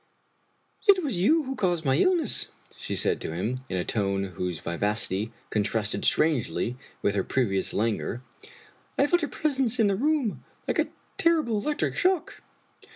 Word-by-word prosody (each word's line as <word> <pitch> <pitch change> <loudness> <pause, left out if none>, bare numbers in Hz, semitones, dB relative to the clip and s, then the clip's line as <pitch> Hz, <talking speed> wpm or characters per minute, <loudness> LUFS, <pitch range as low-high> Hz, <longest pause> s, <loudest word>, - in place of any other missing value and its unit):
" - - -25
It 380 -3 +7
was 250 - -1
you 310 - +4
who 270 0 -4
caused 175 -7 0
my 135 -1 +3
illness," 340 - +2 0.3
she - - -4
said - - +1
to 80 - -3
him, 115 +9 -2
in 95 - -1
a 90 - -1
tone 100 -2 0
whose 90 0 -3
vivacity 105 +5 -1 0.2
contrasted 105 0 0
strangely 130 -5 +2 0.3
with 100 - +2
her 100 -2 +1
previous 100 -7 0
languor. 115 +2 -1 0.4
" - - -29
I 280 - +5
felt 350 +4 +2
your 300 - -1
presence 265 -6 0
in 225 - +5
the 200 -1 +2
room 280 -1 0 0.2
like - - 0
a - - +3 0.3
terrible 310 -10 +3
electric 295 +8 -1
sfiock." 370 -3 +2
160 Hz, 165 wpm, -27 LUFS, -, 0.4 s, It